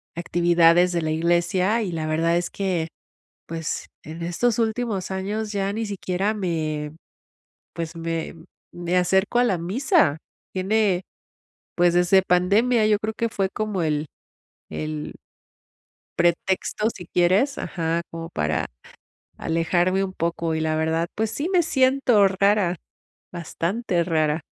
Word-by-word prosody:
actividades 175 +1 +4
de 170 - 0
la 155 - -2
iglesia 175 +6 +1
y 200 -5 -2
la 160 -2 -3
verdad 165 +2 +1
es 175 - -2
que, 180 -5 -1 0.6
pues, 165 -1 -4 0.2
en 160 +2 -7
estos 205 +7 0
últimos 220 -4 -1
años 205 +3 -3
ya 200 -1 -1
ni 225 +1 -2
siquiera 200 0 -1
me, 155 -6 -2 0.8
pues, 165 -1 -5
me 165 0 -3 0.4
me 175 0 -2
acerco 190 +6 +2
a - - +5
la 195 -7 +1
misa. 190 - +2 0.4
Tiene, 190 -1 +1 0.7
pues, 175 -1 +3
desde 180 +2 +5
pandemia, 205 +6 +3
yo 210 -1 +4
creo 220 +1 -3
que 230 - 0
fue 195 -3 -1
como 210 -2 -2
el 150 -1 0 0.7
el 155 -1 -5 1.0
pretexto, 185 +5 +1
si 180 -5 -10
quieres 185 - +2
Ajá, 165 -2 -2
como 165 0 -6
para 75 - -1 0.7
alejarme 175 +3 +1
un 190 -1 -4
poco, 165 -1 -1
y - - -1
la 160 0 0
verdad, 160 +1 0
pues, 220 0 -1
sí 300 +8 -2
me 360 -3 +4
siento 260 -7 +4
rara, 195 -1 +2 0.6
bastante 175 +2 -2
rara. 160 -2 +1
180 Hz, 135 wpm, -23 LUFS, 165-205 Hz, 1.0 s, a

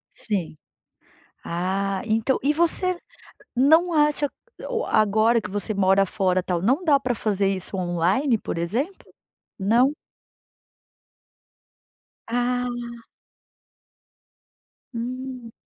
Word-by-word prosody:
Sim. 195 -8 -2 0.9
Ah, 190 +3 -1
entã 225 +4 +1
e 290 +2 +3
você 345 +3 +1 0.6
não 320 +7 +4
acha 295 -1 +2 0.4
o - - -1
agora 220 +2 +3
que 210 - -7
você 205 +2 -3
mora 195 0 +3
fora, 185 -1 0
tal, 175 -2 -1
não 260 - +2
dá 290 -5 +4
pra 250 -2 -1
fazer 200 -2 0
isso 190 0 -3
online, 185 - +1
por - - -5
exemplo? 240 - -3 0.5
Não? 240 +9 +3 2.3
Ah! 240 0 -2 1.9
Hum. 250 0 -6
230 Hz, 95 wpm, -24 LUFS, 195-265 Hz, 2.3 s, não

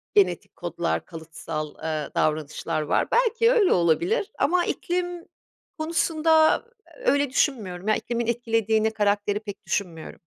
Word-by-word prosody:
genetik 405 -2 +2
kodlar, - - -2
kalıtsal, 160 -2 -6
eee, 155 -2 -2
davranışlar 155 0 -1
var. 150 - +1
Belki 465 -1 +3
öyle 450 -6 +4
olabilir 340 - +1
ama 350 +3 +2
iklim 355 -1 -3 0.5
konusunda 320 +1 +2 0.4
öyle 285 - +2
düşünmüyorum 215 - -1
ya, 215 - +4
iklimin 235 -1 -3
etkilediğini 225 -2 +1
karakteri 205 -1 0
pek 210 -2 -9
düşünmüyorum. 170 -5 -4
225 Hz, 115 wpm, -25 LUFS, -, 0.5 s, öyle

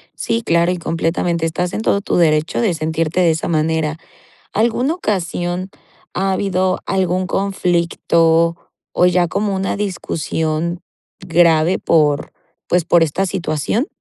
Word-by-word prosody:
Sí, 230 - -1
claro, 170 -3 +2
y 180 - -2
completamente 165 0 -1
estás 175 +2 -2
en 215 - -2
todo 200 - +1
tu - - -2
derecho 155 0 +2
de 215 -6 +2
sentirte 160 +1 -1
de 170 -2 +4
esa 160 - -2
manera. 160 -1 0 0.6
¿Alguna 240 +7 +1
ocasión 180 - -2 0.4
ha 190 +1 0
habido 185 -1 0
algún 185 -1 0
conflicto, 170 -3 +1 0.4
o 180 - +3
ya 180 -1 +3
como 200 +4 -1
una 190 +1 -2
discusión 170 -3 -2 0.4
grave 170 -1 +3
por, 150 -3 +2 0.4
pues 175 -2 +1
por 170 -1 +4
esta 165 +5 0
situación? 185 - -1
175 Hz, 135 wpm, -18 LUFS, 165-190 Hz, 0.6 s, de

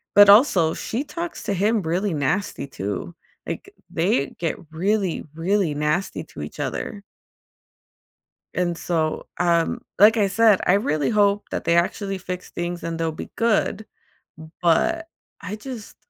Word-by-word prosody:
But 205 0 +9
also, 200 - +6
she 240 +5 -3
talks 335 +3 -6
to 205 - -1
him 210 +4 +2
really 180 +3 -1
nasty 155 +3 -1
too. 105 - -5 0.3
Like, 395 - -6 0.2
they 165 -5 +1
get 165 -2 -2
really, 190 +2 0
really 175 +1 +1
nasty 150 +5 -1
to - - -10
each - - -8
other. 200 - -4 1.5
And 175 -2 -1
so, 160 -3 -1
um, 170 -2 +2 0.2
like 215 +3 +7
I 205 -2 +3
said, 210 0 +4
I 180 - +4
really 155 -7 +1
hope 205 -2 +2
that - - -3
they 170 - +3
actually 195 +3 0
fix 180 -1 -6
things 175 0 -4
and 165 0 -3
they'll 165 -1 0
be 155 - -8
good, 220 -2 +1 0.8
but 330 - +2 0.3
I 200 +1 -5
just 225 -1 -8
185 Hz, 145 wpm, -23 LUFS, 165-210 Hz, 1.5 s, But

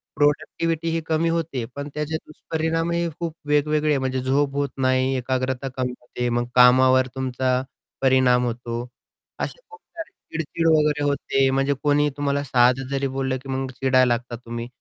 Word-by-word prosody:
प्रोडक्टिव्हिटीही 165 +2 0
कमी 165 +1 +1
होते. 160 -8 -2
पण 145 +1 -5
त्याचे 150 +1 -3
दुष्परिणामही 165 +2 -2
खूप 165 -2 -3
वेगवेगळे 150 0 +2
म्हणजे 130 0 -1
झोप 140 +1 +1
होत 140 -1 0
नाही, 130 0 +2
एकाग्रता 130 +1 -2
कमी 125 -1 -1
होते, 125 0 -3
मग 120 0 0
कामावर 130 +1 +6
तुमचा 130 -1 0 0.4
परिणाम 130 -2 +4
होतो, 120 0 -4 0.5
असे - - -4
खूप 445 0 -14 0.2
सारी 330 - -6 0.2
चिडचिड 160 +1 -2
वगैरे 150 -2 +3
होते 135 -1 +1
म्हणजे 135 +1 +1
कोणी 145 0 +3
तुम्हाला 140 0 0
साधं 130 0 +3
जरी 135 0 -1
बोललं 135 -1 -1
की 135 - -12
मग 130 0 -2
चिडायला 130 0 +3
लागता 120 0 -1
तुम्ही. 120 0 -6
135 Hz, 150 wpm, -23 LUFS, 130-150 Hz, 0.5 s, कामावर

